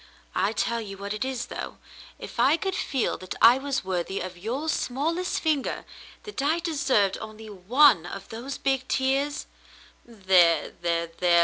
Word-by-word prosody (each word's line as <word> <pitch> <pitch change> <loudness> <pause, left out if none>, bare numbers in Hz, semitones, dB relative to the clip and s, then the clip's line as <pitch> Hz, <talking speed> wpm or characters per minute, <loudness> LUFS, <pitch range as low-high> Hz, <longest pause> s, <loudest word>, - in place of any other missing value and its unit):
I 200 - +1
tell 235 +1 -1
you 195 -3 -8
what 200 +1 -4
it 215 - -2
is, 260 -2 -3
though, - - -7 0.4
if - - -9
I 270 +6 +5
could 385 +2 -2
feel 270 -8 -1
that 185 - -7
I 240 +3 +7
was 275 0 -2
worthy 185 +1 -2
of 185 0 -6
your 235 - -4
smallest 320 +6 -1
finger 305 -4 -1 0.2
— - - -20
that 420 -9 -5
I 300 +4 +2
deserved 280 - +1
only 215 0 -9
one 205 - +4
of - - -8
those 245 +5 -6
big 270 -1 0
tears 275 +2 0 0.3
— - - -25
there 185 -7 +3
— - - -32
there 170 -1 0
— - - -30
there 175 -1 +5
235 Hz, 185 wpm, -26 LUFS, 190-280 Hz, 0.4 s, I